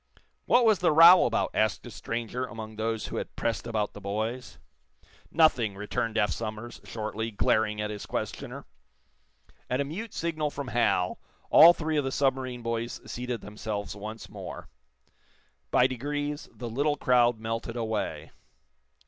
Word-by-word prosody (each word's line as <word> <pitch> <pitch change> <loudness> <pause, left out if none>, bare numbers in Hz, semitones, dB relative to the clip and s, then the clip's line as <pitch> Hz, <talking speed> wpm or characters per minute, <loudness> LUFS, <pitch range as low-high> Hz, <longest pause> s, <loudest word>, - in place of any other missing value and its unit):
"What 245 0 +5
was 220 -3 +4
the 175 - +3
row 170 +4 +9
about?" 115 - 0
asked 105 -4 +1
a - - -8
stranger 120 +2 -4
among 110 -1 -8
those 110 0 -2
who - - -5
had - - -5
pressed 115 0 -2
about 110 -3 -1
the 105 - -10
boys. 110 +5 -4 0.7
"Nothing," 125 -10 +3
returned 105 +2 -2
Eph 105 -4 +2
Somers, 110 +5 -5
shortly, 110 0 -4
glaring 105 0 +1
at 105 0 -2
his 105 -1 -7
questioner. - - -5 1.0
At 125 - 0
a - - +2
mute 200 +10 -6
signal 155 -3 -1
from 140 -3 -6
Hal 110 -6 +1 0.3
all 170 +1 +10
three 160 -2 -2
of 145 - +2
the 135 - -2
submarine 130 -3 -1
boys 115 0 -3
seated 125 -2 -4
themselves 105 -2 -5
once 110 +2 -7
more. - - -9 1.0
By 125 - +4
degrees 145 +3 -3
the 120 - -7
little 145 +6 0
crowd 120 -3 +3
melted 115 +1 -4
away. 110 -3 -3
115 Hz, 150 wpm, -28 LUFS, 110-140 Hz, 1.0 s, all